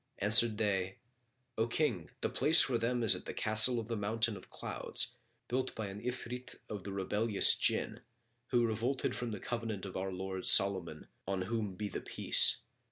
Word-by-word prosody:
Answered 110 Hz, +2 st, +5 dB
they, 95 Hz, -3 st, -1 dB, 0.6 s
'O 115 Hz, -, +2 dB
King, 115 Hz, -, -1 dB
the -, -, -1 dB
place 160 Hz, +2 st, +5 dB
for 120 Hz, -3 st, -1 dB
them 120 Hz, +1 st, -1 dB
is 110 Hz, -, +7 dB
the -, -, -7 dB
Castle 110 Hz, +3 st, +3 dB
of 110 Hz, -, -6 dB
the 115 Hz, -, -3 dB
Mountain 110 Hz, +1 st, 0 dB
of 95 Hz, -, -12 dB
Clouds, -, -, -2 dB, 0.3 s
built 130 Hz, +1 st, -2 dB
by 105 Hz, -3 st, -5 dB
an 100 Hz, +2 st, -8 dB
Ifrit 125 Hz, +1 st, -6 dB
of 105 Hz, -3 st, -7 dB
the 100 Hz, -, -6 dB
rebellious 105 Hz, +2 st, +3 dB
Jinn, -, -, 0 dB, 0.5 s
who 120 Hz, -2 st, +2 dB
revolted 115 Hz, +4 st, -2 dB
from 120 Hz, -, -4 dB
the 105 Hz, -3 st, -5 dB
covenant 115 Hz, -4 st, -4 dB
of 95 Hz, -, -8 dB
our 95 Hz, +1 st, -3 dB
lord 95 Hz, 0 st, -5 dB
Solomon, 95 Hz, -5 st, +3 dB, 0.2 s
on 95 Hz, -1 st, -2 dB
whom 105 Hz, -2 st, -3 dB
be 105 Hz, +2 st, -4 dB
the -, -, -6 dB
Peace! -, -, +2 dB
110 Hz, 175 wpm, -33 LUFS, 95-115 Hz, 0.6 s, is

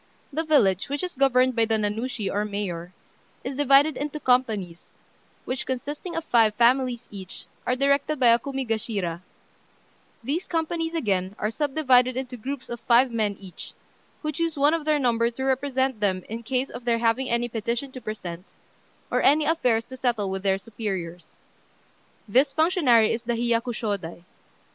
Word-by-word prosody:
The 320 Hz, +3 st, 0 dB
village, 220 Hz, -, +3 dB
which 285 Hz, +3 st, -2 dB
is 360 Hz, -, -3 dB
governed 255 Hz, -2 st, +3 dB
by 230 Hz, -1 st, +3 dB
the 225 Hz, 0 st, +1 dB
Nanushi, 215 Hz, +2 st, -2 dB
or 205 Hz, +1 st, 0 dB
mayor, 190 Hz, -5 st, -4 dB, 0.5 s
is 275 Hz, -, -4 dB
divided 280 Hz, +1 st, +5 dB
into 295 Hz, +2 st, -4 dB
companies, 220 Hz, -, 0 dB, 0.6 s
which, 255 Hz, +1 st, -3 dB
consisting 290 Hz, +7 st, -4 dB
of 330 Hz, -, -2 dB
five 225 Hz, -5 st, +3 dB
families 245 Hz, +1 st, +2 dB
each, 190 Hz, -3 st, -9 dB, 0.2 s
are 250 Hz, -, +2 dB
directed 280 Hz, +2 st, +1 dB
by 245 Hz, -2 st, +5 dB
a 230 Hz, +1 st, +5 dB
Kumigashira; 225 Hz, -9 st, -3 dB, 1.0 s
these 315 Hz, +7 st, -2 dB
companies, 330 Hz, 0 st, -2 dB
again, 195 Hz, -, -1 dB
are 210 Hz, -, -1 dB
subdivided 255 Hz, -3 st, +2 dB
into 255 Hz, -1 st, -4 dB
groups 260 Hz, +3 st, -6 dB
of 240 Hz, -, -6 dB
five 245 Hz, +2 st, +4 dB
men 215 Hz, -4 st, -1 dB
each, 190 Hz, -3 st, -10 dB, 0.5 s
who 305 Hz, -, -1 dB
choose 330 Hz, +1 st, -2 dB
one 290 Hz, +2 st, +4 dB
of 330 Hz, -2 st, -1 dB
their 305 Hz, -1 st, +3 dB
number 235 Hz, -4 st, +2 dB
to 240 Hz, +3 st, -6 dB
represent 265 Hz, -2 st, 0 dB
them 190 Hz, -3 st, 0 dB
in 225 Hz, +2 st, -5 dB
case 255 Hz, +3 st, -2 dB
of 245 Hz, -, -8 dB
their 235 Hz, -1 st, +2 dB
having 235 Hz, +3 st, +1 dB
any 235 Hz, +1 st, +1 dB
petition 235 Hz, +4 st, -3 dB
to 255 Hz, -, -9 dB
present, 180 Hz, -6 st, -6 dB, 0.7 s
or -, -, +2 dB
any 300 Hz, +2 st, +4 dB
affairs 250 Hz, -8 st, +2 dB
to 260 Hz, -, -10 dB
settle 230 Hz, -6 st, 0 dB
with 190 Hz, 0 st, -3 dB
their 195 Hz, -1 st, +2 dB
superiors. 190 Hz, -6 st, -6 dB, 0.9 s
This 260 Hz, +7 st, +3 dB
functionary 310 Hz, -, +4 dB
is 230 Hz, -, -3 dB
the 240 Hz, 0 st, -2 dB
Hiyakushôdai. 230 Hz, -7 st, -2 dB
240 Hz, 160 wpm, -25 LUFS, 215-275 Hz, 1.0 s, divided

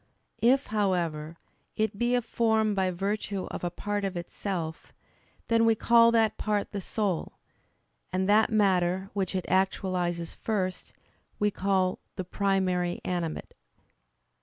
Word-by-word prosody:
If, 265 Hz, +4 st, +4 dB
however, 170 Hz, -6 st, 0 dB, 0.4 s
it 215 Hz, -2 st, -1 dB
be 240 Hz, +1 st, +2 dB
a 245 Hz, -, +1 dB
form 220 Hz, -2 st, +1 dB
by 190 Hz, -2 st, +1 dB
virtue 195 Hz, +1 st, -2 dB
of -, -, -6 dB
a 175 Hz, -, 0 dB
part 205 Hz, +3 st, -3 dB
of 195 Hz, -2 st, -2 dB
itself, 170 Hz, -2 st, -5 dB, 0.5 s
then 230 Hz, 0 st, +3 dB
we 225 Hz, -1 st, +4 dB
call 230 Hz, +1 st, +5 dB
that 225 Hz, -2 st, +2 dB
part 210 Hz, -1 st, -1 dB
the 200 Hz, -, -4 dB
soul: 195 Hz, -3 st, -2 dB, 0.8 s
and 185 Hz, +1 st, 0 dB
that 215 Hz, +2 st, +5 dB
matter, 190 Hz, -3 st, +2 dB
which 195 Hz, -2 st, -2 dB
it 185 Hz, -, -1 dB
actualizes 180 Hz, -2 st, 0 dB
first, 190 Hz, -4 st, -3 dB, 0.4 s
we 210 Hz, 0 st, +1 dB
call 190 Hz, -1 st, 0 dB, 0.2 s
the 185 Hz, -, -3 dB
"primary 185 Hz, -2 st, 0 dB
animate." 175 Hz, -3 st, -3 dB
195 Hz, 135 wpm, -28 LUFS, 180-215 Hz, 0.8 s, call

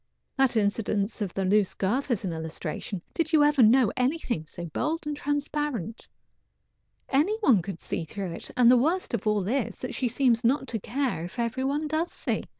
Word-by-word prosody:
That 265 Hz, -4 st, +3 dB
incident 205 Hz, 0 st, 0 dB
of 200 Hz, -4 st, -1 dB
the 195 Hz, -, 0 dB
loose 200 Hz, 0 st, +2 dB
girth 245 Hz, +9 st, -1 dB
is 220 Hz, -5 st, 0 dB
an 175 Hz, -, -2 dB
illustration. 160 Hz, +3 st, -5 dB
Did 330 Hz, -1 st, -1 dB
you 305 Hz, -2 st, +6 dB
ever 295 Hz, -2 st, +4 dB
know 235 Hz, 0 st, +5 dB
anything 250 Hz, -, -1 dB
so 170 Hz, +2 st, -7 dB
bold 310 Hz, -, -2 dB
and 295 Hz, 0 st, -2 dB
transparent? 290 Hz, -, -3 dB, 1.0 s
Any 320 Hz, +11 st, +2 dB
one 245 Hz, -, +5 dB
could 180 Hz, -1 st, -6 dB
see -, -, -3 dB
through 190 Hz, +2 st, -5 dB
it, -, -, -5 dB
and 245 Hz, -1 st, +7 dB
the 250 Hz, -, +6 dB
worst 325 Hz, +8 st, 0 dB
of 230 Hz, -, -2 dB
all 210 Hz, -3 st, +1 dB
is 255 Hz, +1 st, -2 dB
she 255 Hz, -, -1 dB
seems 240 Hz, -1 st, +2 dB
not 265 Hz, +3 st, +2 dB
to 225 Hz, -, -2 dB
care 250 Hz, -, -2 dB
if 180 Hz, -, -10 dB
every 235 Hz, +2 st, -1 dB
one 290 Hz, +3 st, -1 dB
does 315 Hz, +3 st, -1 dB
see. -, -, -2 dB
240 Hz, 190 wpm, -27 LUFS, 200-285 Hz, 1.0 s, and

